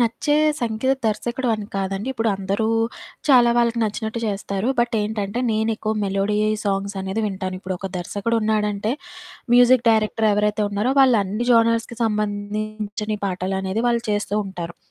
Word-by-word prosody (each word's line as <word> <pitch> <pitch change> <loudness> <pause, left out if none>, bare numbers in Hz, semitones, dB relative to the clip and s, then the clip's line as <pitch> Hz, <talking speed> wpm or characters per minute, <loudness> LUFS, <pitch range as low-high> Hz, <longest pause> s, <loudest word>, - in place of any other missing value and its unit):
నచ్చే 235 +5 +1 0.3
సంగీత 235 +2 0
దర్శకుడు 240 +4 -1
అని 215 -1 -5
కాదండి. 195 +4 -2
ఇప్పుడు 225 -3 0
అందరూ 195 +3 -1 0.6
చాలా 245 -4 +6
వాళ్ళకి 235 0 +2
నచ్చినట్టు 220 +1 -2
చేస్తారు. 200 +1 -2
బట్ 240 0 0
ఏంటంటే, 210 +1 -2
నేనెక్కువ 220 0 0
మెలోడీ 195 +1 0 0.3
సాంగ్సనేది 195 0 -2
వింటాను. 190 -2 -4
ఇప్పుడొక 190 0 -4
దర్శకుడున్నాడంటే, 210 +2 -1 0.6
మ్యూజిక్ 245 0 +6
డైరెక్టరెవరైతే 215 -1 +2
ఉన్నారో 205 +6 0
వాళ్ళన్ని 230 -4 +3
జోనర్స్‌కి 230 0 +2
సంబంధించని 210 0 -2
పాటలనేది 190 +3 -2
వాళ్ళు 235 -1 +1
చేస్తూ 205 -1 -1
ఉంటారు, 175 -3 -6
215 Hz, 115 wpm, -22 LUFS, 200-230 Hz, 0.6 s, చాలా